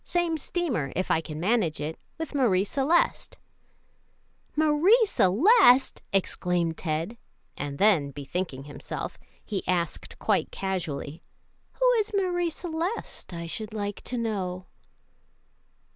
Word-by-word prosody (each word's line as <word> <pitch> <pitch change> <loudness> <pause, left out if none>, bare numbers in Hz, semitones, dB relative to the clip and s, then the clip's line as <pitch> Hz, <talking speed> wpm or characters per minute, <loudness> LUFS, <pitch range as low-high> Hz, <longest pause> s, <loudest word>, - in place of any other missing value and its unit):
Same 345 -2 0
steamer, 290 - -2
if 185 - -1
I 160 - +3
can 155 -1 -7
manage 185 -4 +1
it, 155 +2 -4 0.2
with 320 -2 -5
Marie 225 -10 +3
Celeste." 280 - +1 1.2
"Marie 315 +10 +5
Celeste!" 260 - +5
exclaimed 180 -3 0
Ted; 165 +8 -3 0.4
and 140 0 -4
then, 185 -8 +4
bethinking 140 0 -4
himself, 145 0 -6 0.3
he 200 -3 -2
asked 175 -2 -1
quite - - +1
casually, 170 -5 -3 0.5
"Who - - +2
is 425 0 -2
Marie 355 -3 +1
Celeste, 340 - -4
I 170 -1 -5
should 215 +6 -5
like 205 -1 -3
to 250 - -2
know?" 190 -5 -2
200 Hz, 115 wpm, -27 LUFS, -, 1.2 s, Marie